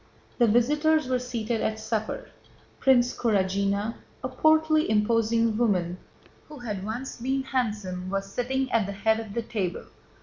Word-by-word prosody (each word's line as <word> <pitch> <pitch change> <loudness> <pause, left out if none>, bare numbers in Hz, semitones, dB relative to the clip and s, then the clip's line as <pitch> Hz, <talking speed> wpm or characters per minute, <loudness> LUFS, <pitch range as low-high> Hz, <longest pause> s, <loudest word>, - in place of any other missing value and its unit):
The 240 - +5
visitors 295 +7 +3
were 255 -1 +1
seated 235 -2 -2
at 220 0 -1
supper. 220 0 -3 0.5
Princess 250 -2 +4
Kurágina, 200 0 +1 0.3
a 255 - -2
portly 315 +3 +3
imposing 230 +1 +2
woman 185 -6 +1 0.5
who 300 - -10
had 210 -6 -5
once 235 +6 -5
been 265 +3 -1
handsome, 210 -9 -2
was 195 0 -1
sitting 255 +5 -2
at 220 -4 +2
the 200 - -4
head 220 +3 +1
of 220 -3 -7
the 235 - -1
table. 200 -6 -3
230 Hz, 145 wpm, -26 LUFS, 205-255 Hz, 0.5 s, The